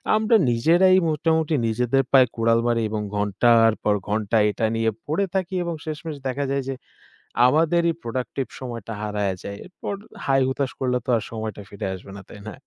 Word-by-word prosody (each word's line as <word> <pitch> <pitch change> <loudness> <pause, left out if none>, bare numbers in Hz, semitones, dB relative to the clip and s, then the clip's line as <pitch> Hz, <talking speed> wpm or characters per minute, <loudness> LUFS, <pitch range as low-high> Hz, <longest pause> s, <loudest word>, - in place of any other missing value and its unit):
আমরা 220 +2 +3 0.2
নিজেরাই 175 +10 +4
মোটামুটি 160 0 +1
নিজেদের 125 +4 +1
পায়ে 130 -2 +7
কুড়াল 115 0 +3
মারি, 115 -1 +1
এবং 105 -1 -2
ঘন্টার 115 +3 +4
পর 105 -1 +3
ঘন্টা 105 +1 0
এটা 110 +2 -1
নিয়ে 115 0 +1 0.2
পড়ে 170 +7 +1
থাকি 185 0 -1
এবং 170 -1 -3
শেষমেশ 155 -1 -5
দেখা 140 +2 -2
যায় 140 -1 0
যে, 135 - -2 0.7
আমাদেরই 165 +4 +3
প্রোডাক্টিভ 125 +2 -3
সময়টা 115 -4 -6
হারায়া 105 -2 -1
যায়। 100 0 -6
এরপর 185 +2 -6 0.3
হায়-হুতাশ 135 0 +1
করলে 125 -1 +1
তো - - -6
আর 105 - -4
সময়টা 110 -2 -5
ফিরে 100 -1 -5
আসবে 95 +1 -12
না, - - -9
তাই 105 - -11
না? - - -8
125 Hz, 170 wpm, -23 LUFS, 110-155 Hz, 0.7 s, পায়ে